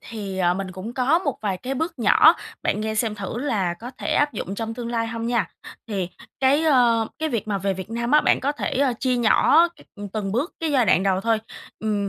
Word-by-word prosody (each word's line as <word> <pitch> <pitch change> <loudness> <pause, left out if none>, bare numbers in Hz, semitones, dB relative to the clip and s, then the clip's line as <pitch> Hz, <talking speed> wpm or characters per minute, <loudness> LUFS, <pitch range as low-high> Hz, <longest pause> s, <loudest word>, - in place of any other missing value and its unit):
thì, 200 -4 -6
ờ, 175 -1 +2
mình 190 0 -4
cũng 190 +6 -7
có 275 +6 +3
một 285 -8 -3
vài 195 -3 -1
cái 260 +7 -4
bước 320 +1 -3
nhỏ, 275 +9 +6 0.3
bạn - - 0
nghe 220 0 -2
xem 220 0 0
thử 200 +2 -5
là 210 -10 -1
có 235 +7 -9
thể - - -2
áp 290 -1 +2
dụng 200 -2 -5
trong 225 +1 -4
tương 240 -1 -5
lai 230 -1 -1
hông 230 0 -4
nha. 235 -1 +1 0.4
Thì 190 -5 -2 0.3
cái, 275 +4 +4
ơ, 240 -7 +4
cái 315 - -1
việc 225 -6 -3
mà 200 -1 0
về 195 0 -1
Việt 190 +3 -8
Nam 235 +2 -2
á 300 0 +6
bạn - - +2
có 280 +3 0
thể, 295 - -3
ơ, 275 -2 +3
chia 255 -2 +1
nhỏ 300 +8 +5
c - - -24 0.4
từng 205 -3 -3
bước 270 - -1
cái 320 -2 -1
giai 255 -5 +3
đoạn 185 - +4
đầu 190 -1 +1
thôi, 225 +1 +1 0.4
ừm, 205 -2 -1
230 Hz, 245 wpm, -23 LUFS, 200-265 Hz, 0.4 s, nhỏ